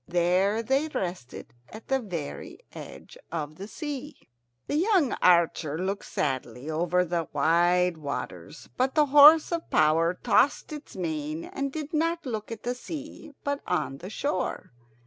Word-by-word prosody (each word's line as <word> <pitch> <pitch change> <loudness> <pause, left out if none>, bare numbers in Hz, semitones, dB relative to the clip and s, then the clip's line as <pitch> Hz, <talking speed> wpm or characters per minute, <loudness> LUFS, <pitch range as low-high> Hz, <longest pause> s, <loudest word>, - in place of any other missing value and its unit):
There 180 +5 +2
they 270 +6 +1
rested, 175 - -5 0.2
at 220 +1 -11
the 270 0 +1
very 175 - -6 0.2
edge - - -11
of 155 -2 -4
the 195 - -7
sea. 295 +2 -6 0.5
The 290 - -1
young 355 - +3
archer 170 -3 +3
looked 195 +3 -3
sadly 130 0 -3
over 175 +3 +1
the 170 -2 -2
wide 175 +3 +3
waters, 145 -2 -6
but 260 +3 +1
the 305 -1 +5
horse 295 +4 +8
of 335 -1 -3
power 165 +3 +3
tossed 280 +9 +2
its 300 -5 -9
mane 155 -3 -3
and 275 0 -4
did 310 +2 -6
not 330 +1 0
look 220 -3 -4
at 230 - -7
the 245 - -1
sea, 300 +3 -8
but 285 0 -2
on 140 -6 -1
the 185 - -8
shore. 215 -4 -3
190 Hz, 150 wpm, -27 LUFS, -, 0.5 s, horse